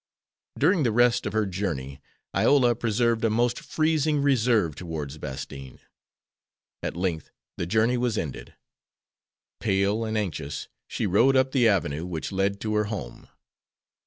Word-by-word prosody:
During 180 - +3
the 120 -5 +2
rest 120 0 +3
of 100 - -4
her 110 -1 +2
journey 80 -8 -4 0.3
Iola 130 -4 +4
preserved 115 0 0
a 115 - +3
most 120 +2 +1
freezing 155 -1 +1
reserve 115 - +2
towards 75 -3 -6
Bastine. 70 -2 -7 1.0
At - - -4
length 85 -4 -2 0.3
the 85 - -3
journey 110 +5 +2
was 120 -3 0
ended. 75 -8 -5 1.0
Pale 100 +1 +1
and 110 0 -2
anxious 80 -8 -3 0.2
she - - -2
rode 115 +8 +4
up 130 0 +3
the 125 -4 +4
avenue 85 -5 0
which 85 0 -4
led 100 +1 0
to 110 -1 -2
her 105 - +2
home. 100 - -6
105 Hz, 140 wpm, -26 LUFS, 85-120 Hz, 1.0 s, Iola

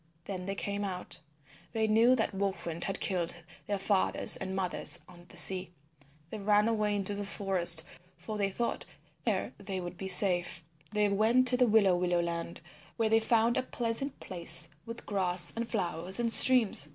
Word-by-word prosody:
Then 185 -1 -6
they 195 - -3
came 200 +1 -4
out. 185 -2 -5 0.5
They 220 -1 0
knew 225 +4 +4
that 225 -4 -2
Wolf 195 0 -3
Wind 170 0 -5
had 195 - -4
killed 175 -3 -3 0.3
their 205 - -1
fathers 195 0 +2
and 190 0 -5
mothers 180 -2 0
on 175 -1 -16
the - - -11
sea. 185 -1 +5 0.6
They 220 - -6
ran 210 +1 +2
away 215 -2 0
into 200 0 -2
the 200 0 -4
forest, 185 -5 +2 0.3
for 215 - -7
they 200 -1 0
thought 235 +5 -3
that - - -3 0.4
there - - -2
they 195 -1 -5
would 175 0 -8
be 190 - -5
safe. 180 -3 +2 0.3
They 210 0 +1
went 220 +6 +2
to 250 - +1
the 250 -1 +3
Willow 205 -4 +4
Willow 175 0 0
Land 170 0 -4 0.4
where 225 -2 +1
they 225 0 +4
found 230 +1 +1
a - - +2
pleasant 245 +2 -4
place 170 -3 -4 0.2
with 230 +1 -8
grass 180 -3 -1
and 230 0 -4
flowers 180 -1 -3
and 230 -1 +1
streams. 230 - +7
195 Hz, 185 wpm, -30 LUFS, 180-220 Hz, 0.6 s, streams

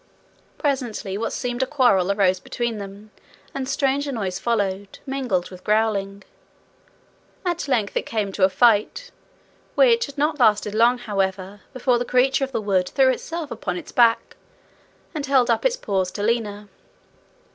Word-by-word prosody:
Presently 245 -8 -2
what 225 +3 -2
seemed 245 -1 -3
a 260 - +1
quarrel 240 -10 +3
arose 190 -2 +2
between 235 +3 -3
them, 200 +2 -10 0.4
and 265 -1 -4
stranger 280 +1 0
noises 195 -7 -3
followed, 200 -3 -2
mingled 255 -11 -2
with 185 0 -12
growling. 200 -2 0 1.2
At 345 -3 -2
length 225 -7 0
it - - -1
came 210 -3 -2
to 190 - -2
a 190 - +6
fight, 240 - +2 0.6
which 470 -4 +4
had 280 - -12
not 300 +1 0
lasted 210 -3 +3
long, 235 +3 +4
however, 195 -3 -3
before 255 -2 +1
the - - 0
creature 265 +2 +2
of 270 - -3
the 235 - -1
wood 190 -3 +1
threw 265 -1 +3
itself 325 +3 -5
upon 185 -5 -4
its - - -9
back, 230 -2 +3 0.8
and 305 -3 -3
held 260 -3 +3
up 230 - 0
its - - +2
paws 190 - -1
to 205 - -4
Lina. 210 -2 -1
230 Hz, 155 wpm, -22 LUFS, 200-265 Hz, 1.2 s, a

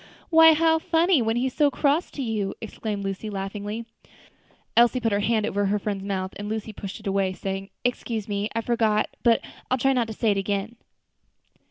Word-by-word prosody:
"Why, 325 0 +8
how 320 +1 +3
funny, 330 -2 +3
when 225 0 0
he's 255 +1 0
so 295 -2 +3
cross 290 +4 +1
to 275 - -5
you!" 215 -4 -2
exclaimed 215 -2 -5
Lucy, 195 +2 -4
laughing. 205 +3 -4 0.9
Elsie 240 +2 +5
put 225 -2 0
her 200 - +2
hand 220 0 +1
over 205 -1 0
her 205 +2 +1
friend's 200 -1 -3
mouth, 190 -1 -3
and 205 0 -5
Lucy 220 0 -4
pushed 195 0 -7
it 215 - -16
away, 195 -1 +1
saying, 195 +1 -5
"Excuse 235 -3 -2
me; 205 0 -2
I 230 - +1
forgot; 220 -2 +1
but 230 -1 +4 0.3
I'll 255 - +2
try 270 +2 +2
not 240 -3 +1
to 220 - -5
say 220 0 +1
it 200 - 0
again." 200 +3 -2
220 Hz, 195 wpm, -25 LUFS, 200-245 Hz, 0.9 s, Why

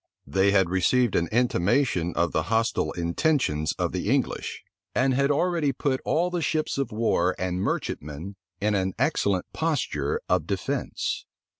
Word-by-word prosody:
They 95 +1 +2
had 95 -2 +4
received 115 +5 +2
an 85 - +2
intimation 105 - +2
of 85 0 +1
the 80 - +1
hostile 115 0 +1
intentions 85 - 0
of - - 0
the - - -2
English, - - -1 0.3
and 130 +1 +3
had 140 +2 +2
already 155 0 +2
put 130 0 -1
all 175 +3 +1
the 175 -1 -1
ships 155 -1 -1
of 135 - -1
war 105 -5 +1
and 90 0 -2
merchantmen 75 +3 -3 0.2
in 105 +1 +1
an 95 -2 0
excellent 95 -3 +1
posture 165 - -1
of - - +1
defence. - - -2
105 Hz, 150 wpm, -26 LUFS, 90-140 Hz, 0.3 s, had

